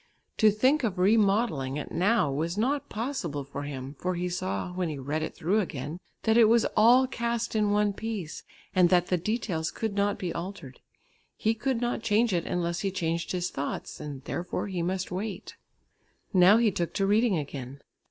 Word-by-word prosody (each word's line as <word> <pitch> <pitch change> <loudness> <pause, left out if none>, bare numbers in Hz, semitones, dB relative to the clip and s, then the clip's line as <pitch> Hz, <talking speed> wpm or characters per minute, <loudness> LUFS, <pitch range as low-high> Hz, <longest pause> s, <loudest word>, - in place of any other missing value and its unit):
To 220 - +6
think 255 +8 +2
of 205 -5 -1
remodelling 195 - +2
it 150 - -6
now 195 -4 +2
was 165 +6 -2
not 270 +6 0
possible 210 - -3
for 140 +1 -7
him, 140 -1 -6
for 185 0 -1
he 180 +1 -2
saw, 100 - -3
when 180 -2 -1
he 150 - -4
read 145 +4 -2
it 155 - -4
through 190 +7 +1
again, 155 -3 -4 0.2
that 220 0 +3
it 235 - +8
was 230 +1 +4
all 240 +5 +6
cast 235 -3 -2
in 210 -1 +2
one 205 0 +2
piece 205 -7 -5 0.3
and 180 -2 +5
that 180 -1 +3
the 180 - +2
details 180 -4 -2
could 220 -2 -3
not 200 0 +1
be 180 -3 -3
altered. 170 -6 -7 0.6
He 220 - +1
could 235 +2 -1
not 240 -1 -1
change 220 0 +2
it, 170 - -1
unless 170 -1 -1
he 195 - -1
changed 170 -2 -2
his 180 -1 -2
thoughts, 140 - -5
and 140 -3 -7
therefore 175 +5 -3
he 185 -4 -3
must 185 +2 -2
wait. 200 +3 -5 0.8
Now 185 +3 +7
he 230 -2 +3
took 170 -2 -3
to 195 - +1
reading 210 0 +3
again. 140 -2 -6
185 Hz, 190 wpm, -28 LUFS, 165-220 Hz, 0.8 s, it